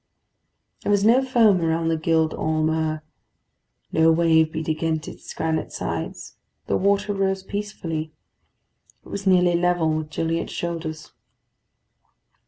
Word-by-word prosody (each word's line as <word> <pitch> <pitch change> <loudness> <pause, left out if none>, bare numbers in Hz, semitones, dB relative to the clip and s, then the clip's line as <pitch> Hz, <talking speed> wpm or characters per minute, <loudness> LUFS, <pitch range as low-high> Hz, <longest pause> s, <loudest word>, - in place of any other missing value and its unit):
There - - -1
was 205 0 +3
no 245 +4 +5
foam 225 -8 +4
around 165 0 0
the 165 - +2
Gild 160 0 +1
Holm 155 0 0
'Ur; 155 -1 -1 0.9
no 160 0 +4
wave 160 -1 +3
beat 160 -1 -4
against 160 0 -1
its - - -9
granite 160 -1 -2
sides. - - -5 0.3
The - - 0
water 200 +1 +1
rose 195 -1 0
peacefully. 175 -6 -4 0.9
It - - -13
was 200 0 -4
nearly 180 -2 +4
level 170 -2 +2
with 155 -1 -3
Gilliatt's 165 +1 -2
shoulders. 165 -2 -5
165 Hz, 130 wpm, -23 LUFS, 160-190 Hz, 0.9 s, no